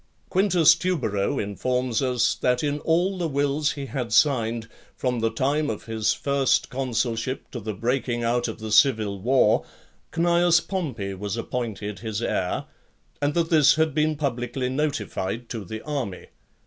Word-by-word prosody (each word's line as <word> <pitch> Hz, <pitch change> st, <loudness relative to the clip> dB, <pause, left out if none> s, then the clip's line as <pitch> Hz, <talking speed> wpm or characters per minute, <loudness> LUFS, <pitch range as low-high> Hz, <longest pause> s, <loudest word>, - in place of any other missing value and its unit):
Quintus 180 Hz, -4 st, +5 dB
Tubero 140 Hz, -, -1 dB
informs 125 Hz, +4 st, -1 dB
us, 125 Hz, -3 st, +2 dB
that 125 Hz, +1 st, 0 dB
in 145 Hz, 0 st, 0 dB
all 175 Hz, +5 st, +1 dB
the 170 Hz, -, 0 dB
wills 145 Hz, +1 st, 0 dB
he 140 Hz, -2 st, -5 dB
had 125 Hz, -2 st, -4 dB
signed, 115 Hz, 0 st, +2 dB, 0.3 s
from 125 Hz, -2 st, -1 dB
the 115 Hz, 0 st, +1 dB
time 140 Hz, +6 st, 0 dB
of -, -, -5 dB
his 110 Hz, -2 st, 0 dB
first 140 Hz, -2 st, +1 dB
consulship 125 Hz, -1 st, -2 dB
to 120 Hz, -, -5 dB
the 110 Hz, -1 st, -5 dB
breaking 120 Hz, +2 st, -1 dB
out 120 Hz, +1 st, +1 dB
of 110 Hz, -, -5 dB
the 110 Hz, 0 st, -6 dB
civil 110 Hz, -4 st, +3 dB
war, 125 Hz, -1 st, +3 dB, 0.5 s
Cneius 170 Hz, 0 st, +4 dB
Pompey 130 Hz, -, -4 dB
was 100 Hz, +3 st, -4 dB
appointed 110 Hz, -5 st, -4 dB
his 110 Hz, -1 st, -4 dB
heir, 95 Hz, -5 st, -1 dB, 0.6 s
and 145 Hz, 0 st, 0 dB
that 170 Hz, -1 st, +1 dB
this 155 Hz, -3 st, +6 dB
had 160 Hz, -1 st, +1 dB
been 155 Hz, +1 st, +1 dB
publicly 125 Hz, -2 st, -2 dB
notified 130 Hz, -6 st, -2 dB
to 115 Hz, -3 st, -5 dB
the 110 Hz, +4 st, -7 dB
army. 135 Hz, -11 st, -4 dB
125 Hz, 155 wpm, -25 LUFS, 110-150 Hz, 0.6 s, this